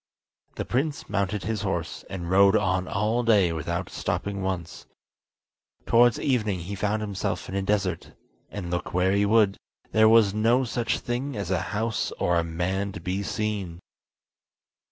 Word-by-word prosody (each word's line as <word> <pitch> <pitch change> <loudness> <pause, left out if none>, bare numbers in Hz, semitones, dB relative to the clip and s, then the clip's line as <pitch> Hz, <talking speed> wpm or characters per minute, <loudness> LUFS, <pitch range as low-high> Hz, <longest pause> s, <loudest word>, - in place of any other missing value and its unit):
The - - -3
prince 145 +4 -1
mounted 100 0 -1
his 110 -2 -2
horse, 90 -4 -3
and 95 -3 -5
rode 100 +3 +5
on 95 -2 0
all 110 +4 0
day 105 -7 +3
without 85 +3 -3
stopping 100 -1 -3
once. 90 -4 -4 1.0
Towards 120 -1 +4
evening 110 -9 0
he 95 +5 -6
found 105 +2 -1
himself 100 -2 -3
in - - -7
a 100 - 0
desert, 95 -2 -1 0.4
and, 90 -4 -6
look 85 0 -3
where 90 +1 +3
he 100 +1 +2
would, 105 -2 +3 0.3
there 110 0 +5
was 110 -3 +5
no 115 +5 +3
such 120 -1 -1
thing 125 +1 -3
as 100 -3 -3
a 95 -2 +1 0.2
house 110 0 -1
or 85 -1 +1
a - - 0
man 90 +4 -2
to - - -6
be 90 +3 -2
seen. 100 -4 -3
100 Hz, 160 wpm, -26 LUFS, 90-110 Hz, 1.0 s, rode